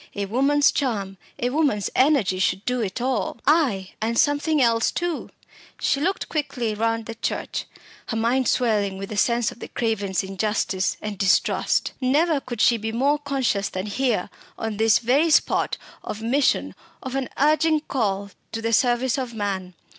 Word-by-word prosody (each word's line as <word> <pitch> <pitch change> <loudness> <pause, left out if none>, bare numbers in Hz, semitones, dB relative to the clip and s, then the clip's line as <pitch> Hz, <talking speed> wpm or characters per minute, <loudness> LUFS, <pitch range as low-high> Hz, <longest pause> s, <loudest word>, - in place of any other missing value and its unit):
A 200 - -2
woman's 275 +7 +3
charm, 200 -8 -2 0.2
a 245 +1 -1
woman's 275 -9 +1
energy 255 -10 +3
should 190 +2 0
do 250 -1 0
it 200 +1 -3
all. 250 -2 -1
Ay, 255 - +2
and 230 +1 -1
something 290 +3 +2
else 230 -3 +3
too. 345 -2 -3 0.5
She 275 - +1
looked 385 +5 -1
quickly 275 -7 -2
round 225 +1 -1
the 230 - -6
church, 225 - -3 0.4
her 225 - -2
mind 240 +3 +1
swelling 210 -6 +1
with 195 0 -6
the 215 - -5
sense 235 +2 +2
of - - -14
the - - -7
Cravens' 205 -5 -1
injustice 195 0 -1
and 210 -3 -5
distrust. 190 -2 +2
Never 295 +4 +2
could 240 -4 -5
she 235 - +5
be 220 0 -4
more 280 +6 +1
conscious 265 -8 -1
than 185 +1 -4
here 225 -2 -1 0.3
on 225 -2 -4
this 220 -1 +4
very 270 +8 +2
spot 305 - +2 0.3
of 210 - -5
mission, 230 - +1 0.3
of 260 - -5
an 270 -1 -2
urging 310 +2 +3
call 200 -8 -2 0.2
to 225 - -3
the 230 0 0
service 245 +2 +2
of 245 -3 -5
man. 190 -4 -3
235 Hz, 170 wpm, -23 LUFS, 205-275 Hz, 0.5 s, she